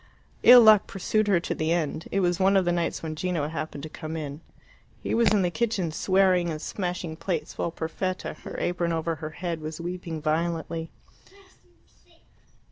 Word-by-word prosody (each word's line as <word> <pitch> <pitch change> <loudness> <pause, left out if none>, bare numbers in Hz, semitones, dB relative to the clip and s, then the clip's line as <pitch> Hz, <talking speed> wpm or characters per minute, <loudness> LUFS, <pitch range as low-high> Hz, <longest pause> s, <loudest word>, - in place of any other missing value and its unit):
Ill 245 0 +10
luck 215 -3 +7
pursued 215 +2 0
her 195 -4 +4
to - - -3
the 155 +1 -1
end. 160 -1 -1
It 195 - +1
was 175 0 +1
one 195 +1 +4
of 190 - +2
the 175 - +2
nights 170 -1 -1
when 155 -1 -4
Gino 170 -3 -1
happened 155 -2 -5
to - - -4
come 155 +1 -6
in. 150 0 -6 0.6
He - - -2
was 230 -2 +4
in 205 -2 +3
the 175 - 0
kitchen, 210 -6 -1
swearing 185 0 +2
and 155 -2 -4
smashing 175 -2 -4
plates, 165 -1 -3
while - - -1
Perfetta, 170 +3 -4
her - - -8
apron 175 -1 -1
over 165 0 -1
her 155 0 -5
head, 170 0 -4
was 155 +1 -6
weeping 175 -1 -5
violently. 165 +1 -2
170 Hz, 180 wpm, -26 LUFS, 160-185 Hz, 0.6 s, Ill